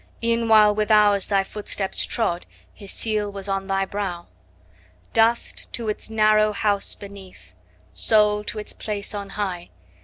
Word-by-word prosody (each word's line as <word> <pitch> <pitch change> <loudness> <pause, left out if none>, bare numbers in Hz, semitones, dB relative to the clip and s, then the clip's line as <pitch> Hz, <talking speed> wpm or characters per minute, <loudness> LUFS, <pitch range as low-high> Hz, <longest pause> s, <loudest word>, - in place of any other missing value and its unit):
E'en 230 0 +1
while 215 -2 +6
with 215 +1 -1
ours 205 -2 +4
thy 195 -1 +2
footsteps 200 -1 -2
trod, 180 -7 0 0.3
His 200 -2 -8
seal 215 -2 -1
was 200 0 -7
on 195 -1 -2
thy 195 0 0
brow. 190 -4 -4 0.9
Dust, 225 +1 +1
to 230 -2 -3
its 210 - -5
narrow 215 -1 +3
house 205 -1 0
beneath! 190 - -13 0.4
5 - - -15
Soul, 210 -1 +3
to 215 - -2
its 210 - -4
place 205 -1 -5
on 200 -1 -5
high! 185 -4 -3
210 Hz, 155 wpm, -23 LUFS, 195-215 Hz, 0.9 s, while